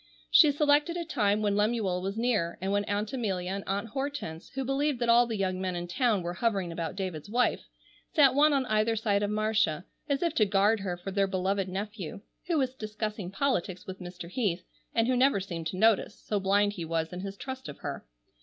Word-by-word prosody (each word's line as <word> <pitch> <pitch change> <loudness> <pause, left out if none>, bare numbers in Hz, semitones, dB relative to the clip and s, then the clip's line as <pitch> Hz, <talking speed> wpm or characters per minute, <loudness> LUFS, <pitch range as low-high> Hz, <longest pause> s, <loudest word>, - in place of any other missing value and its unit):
She 310 -4 +8
selected 295 +3 +2
a 340 - -3
time 210 -8 +1
when 205 -1 +2
Lemuel 205 -4 +1
was 195 +3 -3
near, 225 -8 0
and 190 +2 -2
when 205 0 +1
Aunt 205 +2 -2
Amelia 190 -8 -2
and 195 0 -3
Aunt 200 +4 -2
Hortense, 270 - -4
who 270 -1 -2
believed 275 +1 0
that 240 -1 -1
all 240 +1 +6
the 225 -2 -3
young 185 -1 -1
men 185 -1 -2
in 175 0 -4
town 220 -1 +1
were 175 0 -3
hovering 195 -3 0
about 165 0 -4
David's 185 -3 -5
wife, 245 +3 +1 0.4
sat 275 -4 +5
one 300 +3 +5
on 275 -2 +2
either 215 0 +2
side 205 -2 +1
of 205 - 0
Marcia, 210 -6 +1 0.2
as 280 +3 +1
if 335 -3 +1
to 215 - +3
guard 205 +3 +3
her 185 -3 -3
for 185 +2 -6
their 195 0 +2
beloved 190 0 -1
nephew—who 205 - -5
was 260 -3 +1
discussing 215 -4 -4
politics 195 -4 -1
with 190 0 -7
Mr. 175 -1 -8
Heath—and 210 +2 -2
who 255 - +2
never 255 -4 +4
seemed 170 -4 -5
to 185 - -4
notice, 220 +1 +3
so 210 - -2
blind 205 +1 +2
he 180 -5 -5
was 165 0 -2
in 180 - -5
his 195 +1 -6
trust 260 +2 -6
of - - -8
her. - - -5
205 Hz, 210 wpm, -29 LUFS, 185-240 Hz, 0.4 s, She